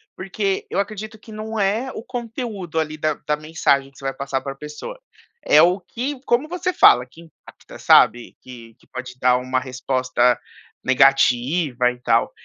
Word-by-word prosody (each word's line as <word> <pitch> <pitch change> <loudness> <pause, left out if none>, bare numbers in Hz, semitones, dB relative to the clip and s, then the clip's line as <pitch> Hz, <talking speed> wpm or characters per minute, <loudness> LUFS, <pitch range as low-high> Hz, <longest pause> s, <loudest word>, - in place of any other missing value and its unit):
porque 195 +1 -2
eu - - 0
acredito 215 +2 -5
que 220 - -15
não 220 +1 -5
é 215 +7 0
o - - -7
conteúdo 230 -8 -5
ali 155 -1 -3
da 155 0 0
da 150 - +2
mensagem 150 -3 0
que 140 - -23
você 135 - -11
vai 135 - -1
passar 135 -1 -3
pra 135 0 -6
pessoa. 150 - -9 0.5
É 150 - +6
o 180 +4 +4
que, 250 +9 -5
como 240 +5 +1
você 360 +1 -2
fala 125 - +6
que 145 +6 -17
impacta, 165 -1 -16
sabe? 120 0 +4
Que 115 -3 -12
que - - -26
pode 130 0 -8
dar 125 0 +4
uma 130 +1 -1
resposta 130 -1 0 0.4
negativa 130 0 +3
e 125 - -13
tal. - - +2
155 Hz, 175 wpm, -21 LUFS, 130-215 Hz, 0.5 s, É